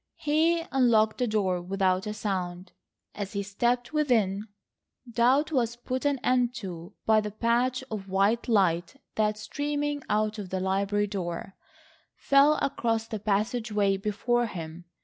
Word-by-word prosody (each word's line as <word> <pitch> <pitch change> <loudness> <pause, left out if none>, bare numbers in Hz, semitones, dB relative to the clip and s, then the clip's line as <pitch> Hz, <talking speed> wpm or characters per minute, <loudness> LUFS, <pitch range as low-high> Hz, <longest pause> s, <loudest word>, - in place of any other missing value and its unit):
He 320 +3 +2
unlocked 230 -4 +3
the 250 - +1
door 190 -5 0
without 190 +1 0
a 210 - -2
sound. 185 -3 -3 0.4
As 200 -1 -5
he 200 -1 -2
stepped 240 +7 -1
within, 220 -9 +1 0.6
doubt 250 +6 +2
was 240 -5 0
put 255 +3 -4
an 285 -1 +2
end 250 -1 +2
to 185 -2 -7
by 220 -1 +4
the 210 - -4
patch 240 +4 0
of 200 -3 -5
white 200 +6 +2
light 190 -2 +2 0.2
that, 215 -1 +1
streaming 290 +5 -2
out 215 0 0
of 195 -3 -6
the 190 - -2
library 195 +2 0
door, 190 -2 -5 0.6
fell 280 +2 +4
across 225 -4 0
the 220 -2 -4
passageway 210 0 0
before 225 +4 0
him. 170 -3 -8
215 Hz, 145 wpm, -27 LUFS, 195-245 Hz, 0.6 s, by